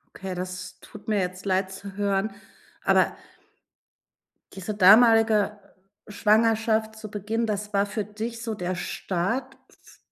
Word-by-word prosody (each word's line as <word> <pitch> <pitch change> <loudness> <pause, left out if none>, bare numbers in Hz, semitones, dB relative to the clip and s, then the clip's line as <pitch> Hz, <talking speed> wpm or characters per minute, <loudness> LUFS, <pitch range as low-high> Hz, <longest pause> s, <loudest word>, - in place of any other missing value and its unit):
Okay, 190 -1 -5
das 185 0 -6
tut 210 0 -14
mir 210 -2 +2
jetzt 185 +1 -4
leid 190 0 0
zu 195 +1 -9
hören. 200 0 0 0.5
Aber - - +3 1.4
diese 195 +2 -5
damalige 215 0 +5 0.5
Schwangerschaft 220 +1 +2
zu 215 -1 -9
Beginn, 215 +3 -2
das 210 0 -3
war 200 0 +2
für 210 +1 -3
dich 225 +3 -6
so 225 -2 -3
der 180 -2 -3
Start 185 +6 -3
f - - -21
210 Hz, 130 wpm, -25 LUFS, 190-220 Hz, 1.4 s, damalige